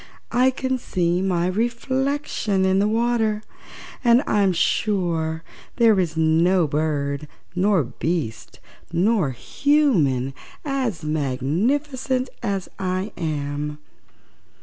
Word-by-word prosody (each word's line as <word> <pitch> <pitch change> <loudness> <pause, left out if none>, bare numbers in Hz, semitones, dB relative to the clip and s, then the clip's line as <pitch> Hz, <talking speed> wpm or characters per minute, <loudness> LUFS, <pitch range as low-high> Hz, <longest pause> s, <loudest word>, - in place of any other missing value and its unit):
"I 255 +2 +4
can 260 0 -2
see 175 -4 0
my 180 -3 +1
reflection 235 0 0
in 190 0 +3
the 205 - +3
water, 225 -1 +1 0.6
and 240 +2 +5
I'm 200 -2 +3
sure 165 -4 0 0.3
there 225 -5 +4
is 165 -3 -1
no 165 +3 +3
bird 145 -1 -1 0.3
nor 185 -2 +2
beast, 120 -4 -4 0.3
nor 180 -1 +2
human 150 - +1 0.3
as 260 - -2
magnificent 235 - -1
as 200 -4 -2
I 185 +2 -2
am!" 150 -2 -3
185 Hz, 100 wpm, -23 LUFS, 160-235 Hz, 0.6 s, and